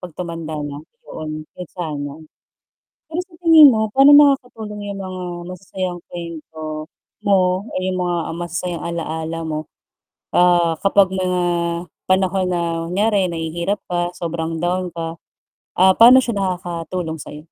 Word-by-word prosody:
'pag 180 Hz, -2 st, -9 dB
tumanda 165 Hz, -1 st, -6 dB
na, 145 Hz, 0 st, -5 dB, 0.3 s
yoon, 155 Hz, 0 st, -6 dB
'yon 180 Hz, -2 st, -7 dB
sana. 150 Hz, -5 st, -4 dB, 0.9 s
Pero 325 Hz, +3 st, -3 dB
sa 355 Hz, -, -22 dB
tingin 315 Hz, -4 st, +9 dB
mo 220 Hz, -2 st, +1 dB
pa'no 275 Hz, +2 st, +7 dB
nakakatulong 245 Hz, -8 st, +4 dB
yung 200 Hz, -, -5 dB
mga 185 Hz, -1 st, -6 dB, 0.3 s
masasayang 185 Hz, -1 st, -5 dB
kuwento 155 Hz, -2 st, -7 dB, 0.4 s
mo 185 Hz, -2 st, +3 dB
o -, -, -9 dB
yung 185 Hz, 0 st, -2 dB
mga 175 Hz, -1 st, 0 dB, 0.2 s
masasayang 175 Hz, 0 st, -4 dB
alaala 165 Hz, -1 st, -4 dB
mo, 155 Hz, -1 st, -2 dB, 0.7 s
ah, 175 Hz, -1 st, +4 dB
kapag 195 Hz, -1 st, +4 dB
mga 185 Hz, -1 st, 0 dB, 0.7 s
panahon 185 Hz, 0 st, +2 dB
na 175 Hz, -1 st, 0 dB, 0.3 s
kunyari 200 Hz, 0 st, +1 dB
nahihirap 170 Hz, +4 st, -2 dB
ka 175 Hz, 0 st, -1 dB
sobrang 165 Hz, -1 st, -3 dB
down 180 Hz, +1 st, -1 dB
ka, 165 Hz, 0 st, -4 dB, 0.6 s
ah, 190 Hz, +1 st, +7 dB
paano 245 Hz, +3 st, +9 dB
siya 235 Hz, -3 st, -2 dB
nakakatulong 175 Hz, -3 st, -3 dB
sa'yo? 150 Hz, -, -9 dB
180 Hz, 135 wpm, -20 LUFS, 165-195 Hz, 0.9 s, tingin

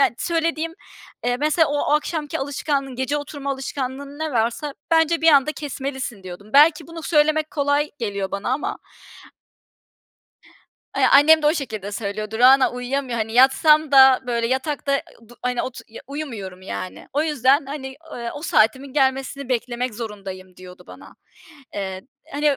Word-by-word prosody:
ya -, -, +5 dB
söylediğim, 330 Hz, -1 st, -1 dB, 0.5 s
eee, 245 Hz, 0 st, +1 dB
"Mesela, 305 Hz, +3 st, +2 dB
o 290 Hz, 0 st, 0 dB
akşamki 300 Hz, 0 st, -1 dB
alışkanlığın, 275 Hz, -1 st, -2 dB
gece 260 Hz, +3 st, -1 dB
oturma 285 Hz, -1 st, -5 dB
alışkanlığın, 275 Hz, +1 st, -5 dB
ne 315 Hz, -2 st, -3 dB
varsa 240 Hz, +5 st, -1 dB, 0.2 s
bence 325 Hz, 0 st, +3 dB
bir 325 Hz, -, +4 dB
anda 290 Hz, 0 st, +5 dB
kesmelisin." 265 Hz, -7 st, -5 dB
diyordum. 185 Hz, +3 st, -10 dB
Belki 305 Hz, +2 st, +5 dB
bunu 330 Hz, 0 st, -9 dB
söylemek 310 Hz, 0 st, +2 dB
kolay 285 Hz, 0 st, 0 dB
geliyor 200 Hz, -4 st, -3 dB
bana 200 Hz, +4 st, -4 dB
ama 270 Hz, -, -2 dB, 2.2 s
Eee, -, -, +3 dB
annem 310 Hz, +3 st, +7 dB
de -, -, +2 dB
o 305 Hz, -, +4 dB
şekilde 215 Hz, -, -5 dB
söylüyordu, 215 Hz, +1 st, -4 dB
"Rana, 260 Hz, +2 st, +6 dB
uyuyamıyor 250 Hz, 0 st, -3 dB
hani, 220 Hz, 0 st, -2 dB
yatsam 295 Hz, +4 st, +5 dB
da, 265 Hz, -1 st, +7 dB
böyle, 235 Hz, -1 st, 0 dB
yatakta, 275 Hz, +2 st, -1 dB
eee, -, -, -4 dB, 0.3 s
du 240 Hz, -, -16 dB
hani, 250 Hz, -1 st, -1 dB
otur 260 Hz, -, -7 dB
ya 230 Hz, -, -11 dB
uyumuyorum 225 Hz, -11 st, -7 dB
yani. 185 Hz, -1 st, -7 dB
O 295 Hz, +2 st, +1 dB
yüzden, 280 Hz, -2 st, +2 dB
hani, 265 Hz, -2 st, -7 dB, 0.2 s
ııı, 235 Hz, -1 st, -5 dB
o 290 Hz, -, -8 dB
saatimin 260 Hz, 0 st, +2 dB
gelmesini 270 Hz, -1 st, 0 dB
beklemek 245 Hz, -1 st, -2 dB
zorundayım." 195 Hz, -5 st, -8 dB
diyordu 185 Hz, 0 st, -13 dB
bana. -, -, -14 dB, 0.6 s
Eee, 190 Hz, -2 st, -4 dB, 0.3 s
hani, 290 Hz, -1 st, +1 dB
270 Hz, 150 wpm, -22 LUFS, 235-295 Hz, 2.2 s, annem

